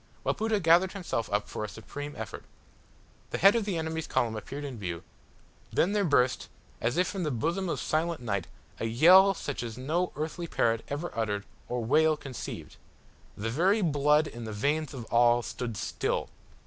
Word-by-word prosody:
Wapoota 220 -1 +1
gathered 175 +2 +4
himself 170 - -3
up 105 0 0
for - - -5
a 105 - -4
supreme 145 +9 -7
effort. 110 -2 -6 0.9
The - - -2
head 195 +3 +6
of 230 -3 +1
the 195 -5 -1
enemy's 160 -1 -3
column 115 -2 0
appeared 140 +7 -6
in 135 -5 -6
view 85 -4 -4 0.7
then 180 - +2
there 205 -1 +2
burst, 130 -7 +2 0.3
as 120 +5 0
if 180 - +4
from 195 - -3
the 155 - 0
bosom 165 +9 -1
of - - -1
silent 165 +1 0
night, 100 -7 -2 0.3
a - - -2
yell 185 - +7
such 145 -4 -4
as 115 -1 -6
no 160 +8 -1
earthly 160 +4 -4
parrot 115 -6 +1
ever 145 +5 -4
uttered 105 -3 -1 0.2
or 125 -2 -2
whale 155 +4 +4
conceived. 135 -4 -7 0.6
The 115 +2 -2
very 190 - +3
blood 150 -1 +3
in 120 -5 -7
the 110 - -5
veins 145 +6 -1
of 120 -3 -6
all 120 0 +5
stood 115 -3 -5
still. - - -2
145 Hz, 180 wpm, -29 LUFS, 115-170 Hz, 0.9 s, yell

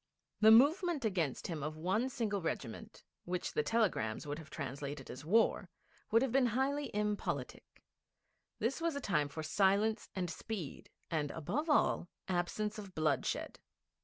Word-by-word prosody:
The 220 - +7
movement 290 - +5
against 170 -10 -1
him 165 -4 -3
of 155 +2 -4
one 190 +10 0
single 215 -6 -1
regiment 115 -8 -5 0.2
which 180 0 -2
the - - +2
telegrams 150 - 0
would 145 +1 -4
have 155 -1 -11
translated 140 -1 -5
as 130 - -8
war 220 +9 +3 0.4
would 230 +3 +4
have 265 - 0
been 260 0 +4
highly 275 +5 0
impolitic. 210 0 -3 0.7
This 255 +7 -1
was 335 -2 0
a - - -1
time 160 - +1
for 160 +2 -5
silence 200 +6 +2
and 185 -2 -1
speed, 175 -1 -6 0.2
and, 150 -3 0
above 280 - -2
all, 290 - +3 0.2
absence 205 +4 -1
of 195 -3 -9
bloodshed. 150 -4 0
195 Hz, 150 wpm, -35 LUFS, 155-230 Hz, 0.7 s, The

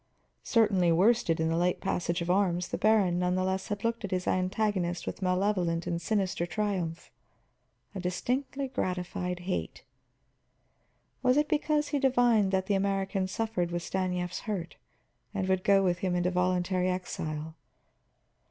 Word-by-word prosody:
Certainly 195 -7 +3
worsted 185 -2 +3
in 160 0 +1
the 165 - +1
late 175 +1 +1
passage 170 0 -1
of 175 - 0
arms, 180 -2 +1
the - - -2
baron 205 -5 +3
nevertheless 185 +1 0
had 205 -1 -4
looked 230 0 -1
at 200 - -3
his 185 -1 -1
antagonist 185 -1 0
with - - -5
malevolent 180 -2 +1
and 170 -1 -2
sinister 185 -2 0
triumph, 180 -5 -3 0.8
a 195 - -5
distinctly 255 +9 -2
gratified 180 -5 -3
hate. 180 +1 -4 1.4
Was 255 +1 +3
it 295 0 +3
because 300 -1 +1
he 290 - 0
divined 245 -7 +3
that 190 -1 +1
the 205 - 0
American 195 0 0
suffered 205 -3 -1
with 175 0 -3
Stanief's 180 -1 -2
hurt, 180 -5 -3 0.6
and 190 -2 -1
would 190 -1 +1
go 195 -1 +4
with 180 -1 +1
him 185 -2 0
into 180 +1 +1
voluntary 180 0 +1
exile? 160 -4 -4
185 Hz, 145 wpm, -29 LUFS, 180-205 Hz, 1.4 s, go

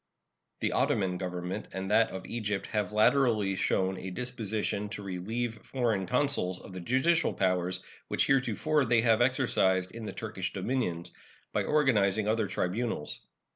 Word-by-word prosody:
The - - +1
Ottoman 90 -3 +1
Government 90 +2 -4
and 95 +1 -3
that 115 +2 +5
of 95 - -7
Egypt 105 -4 -2
have 105 -3 0
latterly 110 -3 +3
shown 95 0 0
a 95 - -5
disposition 105 -1 -2
to 105 -1 -6
relieve 110 +5 -3
foreign 115 -8 -1
consuls 95 -9 +1
of 95 - -11
the 95 - -5
judicial 130 - +2
powers 90 -1 0 0.2
which - - +1
heretofore 135 +3 +2
they 115 -1 +4
have 115 -1 +3
exercised 95 -8 +2
in 115 -1 -7
the - - -4
Turkish 105 -4 -4
dominions, 95 -5 -2 0.4
by - - +1
organizing 110 -9 +2
other 110 -1 +1
tribunals. 95 -2 -3
105 Hz, 145 wpm, -30 LUFS, 95-120 Hz, 0.4 s, that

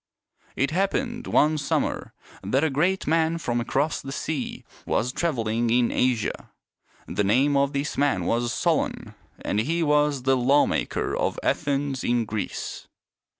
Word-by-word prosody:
It 140 +2 0
happened 235 +7 -1
one 155 +1 +3
summer 140 - -2 0.3
that 130 +9 +1
a 160 - +2
great 175 +8 +1
man 165 +1 +2
from 120 -7 -1
across 140 +6 0
the 135 - -7
sea 145 -1 -4 0.2
was 125 +2 0
traveling 120 -7 0
in 120 0 +3
Asia. 125 -3 0 0.6
The 105 - -1
name 130 +8 +3
of 140 0 +2
this 140 +1 -2
man 135 -12 +1
was 120 +3 0
Solon, - - -1 0.3
and 105 - 0
he 165 +9 0
was 150 -3 +2
the 135 0 +3
lawmaker 135 +3 +1
of - - -1
Athens 140 -1 0
in 120 -1 +1
Greece. 105 -1 -5
140 Hz, 145 wpm, -25 LUFS, 120-150 Hz, 0.6 s, one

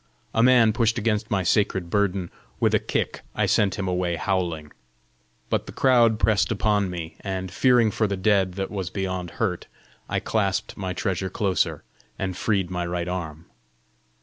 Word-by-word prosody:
A 115 - +3
man 120 -3 +5
pushed 115 +1 +1
against 110 -1 0
my 95 -2 +1
sacred 95 -1 +1
burden: 100 -3 0 0.3
with - - +2
a - - +4
kick - - -2
I - - +2
sent 100 -4 +2
him 95 - -2
away 90 -1 0
howling. 85 -4 -2 0.8
But - - -1
the - - -7
crowd 120 -4 +4
pressed 110 +1 +2
upon 105 -2 +1
me, 85 -2 -6
and 95 -2 -4
fearing 120 +1 +4
for 110 - +1
the 100 -1 -2
dead 95 -1 +2
that 95 0 -3
was 95 -4 -3
beyond 95 -2 -3
hurt, 95 -6 -1 0.4
I - - 0
clasped 100 -4 -1
my 95 -2 -4
treasure 95 0 -2
closer, 95 0 0 0.3
and 95 -1 -3
freed 95 -3 0
my 90 -1 -2
right 85 0 -2
arm. 85 -3 -5
95 Hz, 170 wpm, -24 LUFS, 90-105 Hz, 0.8 s, man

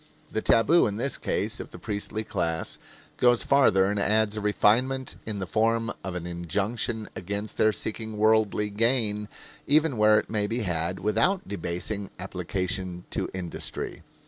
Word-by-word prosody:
The - - -1
tabu 150 +9 +4
in 105 -1 -3
the 130 +3 0
case - - -1
of - - -7
the - - -11
priestly 105 +1 -3
class 85 -6 -2 0.4
goes 120 -1 +4
farther 130 -9 +4
and 100 +1 0
adds 105 +1 +2
a 105 - -3
refinement 125 +5 +2
in 105 -2 -3
the 95 - -3
form 115 +4 +1
of 95 -2 -4
an 90 -1 -4
injunction 105 +6 -2
against 100 +4 -4
their 110 - +4
seeking 110 0 -4
worldly 105 -1 +2
gain 105 -2 +1 0.4
even 150 -2 +3
where 105 0 +6
it - - 0
may 105 -2 -1
be 115 +3 -1
had 90 -2 -1
without 140 - +1
debasing 100 +2 -3
application 90 -1 -3
to - - -2
industry. 90 -3 -5
105 Hz, 155 wpm, -27 LUFS, 95-115 Hz, 0.4 s, where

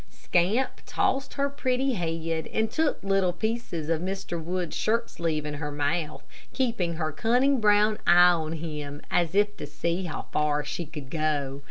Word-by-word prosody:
Scamp 200 +9 0
tossed 270 +1 0
her 280 0 +1
pretty 265 -1 0
head, 165 -3 -2
and 220 0 -1
took 315 -9 0
little 195 -2 +2
pieces 220 -5 -3
of 165 -1 0
Mr. 185 -3 -4
Wood's 175 0 -3
shirt 230 +2 0
sleeve 160 -3 -2
in 150 - -3
her 150 0 -4
mouth, 150 +2 -1 0.3
keeping 225 -10 0
her 155 -1 -2
cunning 250 - +2
brown 210 0 +4
eye 175 +1 +8
on 160 -2 -1
him 150 -3 -5
as 175 0 +1
if 205 0 +3
to 145 - -6
see 170 +5 -2
how 160 - -4
far 150 -1 +1
she 170 - -4
could 150 -4 -9
go. 145 -3 -1
175 Hz, 170 wpm, -27 LUFS, 155-215 Hz, 0.3 s, eye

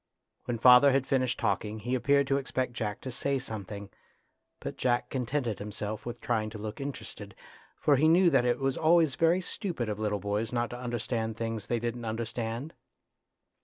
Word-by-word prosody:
When 120 - -2
father 125 +4 +8
had 135 -1 +2
finished 130 -2 +1
talking 105 0 -1
he 120 +4 -3
appeared 140 +2 +3
to 135 +1 +1
expect 130 -2 -2
Jack 105 -4 -3
to 130 - -5
say 140 +2 0
something, 105 -5 -6 0.7
but - - -5
Jack 125 -1 0
contented 125 -4 -1
himself 105 +1 -5
with 120 0 -5
trying 110 -3 -1
to 110 - -8
look 105 +4 -6
interested, 140 0 -7 0.4
for 145 -2 +4
he 155 +4 +4
knew 170 +2 +5
that 125 - +4
it 120 0 +2
was 135 -1 -1
always 160 -2 +4
very 165 +5 +3
stupid 170 - -3
of 105 0 -3
little 105 -1 0
boys 105 +3 -2
not 120 -1 -1
to 120 - -6
understand 115 -2 -2
things 115 -2 -3
they 120 - 0
didn't 120 0 -3
understand. 115 +5 -3
120 Hz, 180 wpm, -29 LUFS, 110-135 Hz, 0.7 s, father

